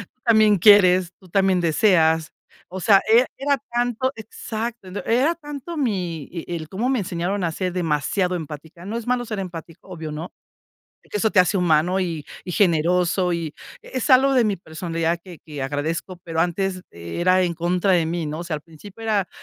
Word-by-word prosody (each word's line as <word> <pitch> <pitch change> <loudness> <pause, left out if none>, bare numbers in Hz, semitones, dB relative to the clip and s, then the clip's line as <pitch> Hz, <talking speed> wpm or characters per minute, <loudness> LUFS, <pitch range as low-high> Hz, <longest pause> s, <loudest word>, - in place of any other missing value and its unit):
tú - - -45
también 215 -3 +5
quieres, 185 -3 +6
tú 185 - -16
también 190 0 +2
deseas". 160 -2 +3 0.4
O 190 +1 -6
sea, 195 +1 +5
era 235 +3 +6
era 280 0 +1 0.2
tanto, 245 +2 0
exacto, 220 0 -6
ent 185 +2 -7
era 265 +9 +2
tanto 295 +1 -8
mi 185 - -2
y 170 -2 -6
y 175 - -3
el 155 -2 -6
cómo 210 +8 -2
me 260 -1 +1
enseñaron 180 +1 -2
a 165 - 0
ser 180 +2 -3
demasiado 180 +2 0
empática. 160 +1 -8
No 210 +3 -4
es 235 0 -7
malo 245 -1 0
ser 215 -2 -4
empático, 170 -1 -8
obvio, 160 -4 -6
¿no? 160 +4 -6 0.8
Que 210 - -3
eso 220 +1 +2
te 205 - +1
hace 185 +2 +4
humano 180 +2 +2
y 165 -5 -3 0.2
y 180 - -5
generoso, 180 0 +2
y 165 -2 -4 0.3
es 255 0 -4
algo 270 +1 +6
de 255 - +4
mi 205 -2 0
personalidad 165 0 -2
que 175 -3 -12
que 150 -3 -6
agradezco, 155 +6 -3
pero 165 -1 -2
antes 185 +2 -1
era 175 - +1
en 175 -1 0
contra 175 +3 0
de 170 -3 +3
mí, 170 0 -2
¿no? 155 +1 -4
O 175 - -5
sea, 170 -2 -3
al 145 - -10
principio 180 +7 -13
era, 205 -5 0
180 Hz, 195 wpm, -22 LUFS, 165-215 Hz, 0.8 s, quieres